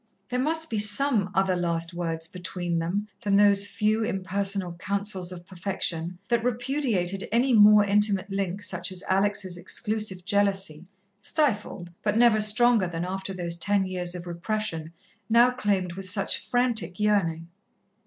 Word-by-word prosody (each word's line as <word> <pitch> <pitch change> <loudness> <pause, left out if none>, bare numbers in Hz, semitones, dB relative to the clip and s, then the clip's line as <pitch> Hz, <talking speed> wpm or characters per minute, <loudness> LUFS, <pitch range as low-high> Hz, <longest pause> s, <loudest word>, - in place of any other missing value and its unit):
There 250 0 -1
must 320 +3 -1
be 220 - 0
some 215 0 +3
other 190 -1 +2
last 170 -1 -2
words 165 -2 -3
between 175 -1 -4
them 190 +6 -2
than 205 -3 +1
those 200 0 +5
few 215 +2 0
impersonal 195 -3 -2
counsels 190 +1 -3
of 175 -1 -9
perfection, 175 -2 -3
that 235 -1 +1
repudiated 240 -7 -1
any 245 +3 +2
more 210 -1 +7
intimate 205 -1 +2
link 195 0 -3
such 185 -1 -1
as 185 0 -4
Alex' 195 -1 0
exclusive 190 +1 -2
jealousy, 195 -5 0 0.3
stifled, 210 - -1
but 210 0 0
never 230 -2 +5
stronger 215 -1 +3
than 170 0 -4
after 190 +1 -4
those 175 -2 -3
ten 200 +2 +1
years 180 -1 -3
of 175 -1 -7
repression, 175 -2 -3 0.4
now 235 +2 +5
claimed 200 -7 -1
with 190 +1 -4
such 195 +1 -1
frantic 240 -7 0
yearning. 170 -6 0
195 Hz, 145 wpm, -26 LUFS, 180-215 Hz, 0.4 s, more